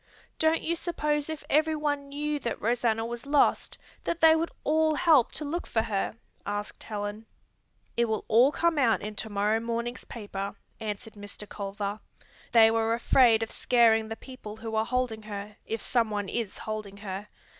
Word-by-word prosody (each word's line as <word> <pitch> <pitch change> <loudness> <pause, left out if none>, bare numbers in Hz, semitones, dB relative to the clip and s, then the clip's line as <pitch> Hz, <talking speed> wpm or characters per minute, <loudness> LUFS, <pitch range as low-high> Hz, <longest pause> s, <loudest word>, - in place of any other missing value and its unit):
"Don't 320 +1 +3
you 335 - 0
suppose 300 -3 -1
if 315 -1 -5
everyone 295 -2 +1
knew 295 +1 -2
that 240 - -3
Rosanna 225 -1 +1
was 240 +2 -6
lost 285 0 +2 0.3
that 340 - -2
they 320 -1 +7
would 330 +1 0
all 315 +1 +3
help 300 -7 +5
to 305 - -2
look 335 +5 -3
for 225 - +1
her?" 205 +1 -2 0.3
asked 205 +1 -4
Helen. 210 +1 -5 0.7
"It 235 - +3
will 220 -2 -2
all 240 +5 +6
come 335 -1 +1
out 235 -5 +3
in 210 +1 -4
to 220 - -3
morrow 210 +2 +1
morning's 235 +1 -3
paper," 200 -3 -5 0.2
answered 220 +1 -5
Mr. 205 0 -9
Culver. 200 +1 -4 0.5
"They 225 -1 +7
were 225 0 +2
afraid 235 -2 +5
of 225 - -5
scaring 225 -3 +4
the 225 - -4
people 240 -4 -10
who 225 0 -6
are 220 0 +2
holding 250 -2 -1
her, 210 0 -7
if 225 0 -2
someone 215 -5 0
is 230 -4 -3
holding 215 -2 -5
her. 195 +2 -5
230 Hz, 170 wpm, -28 LUFS, 215-285 Hz, 0.7 s, they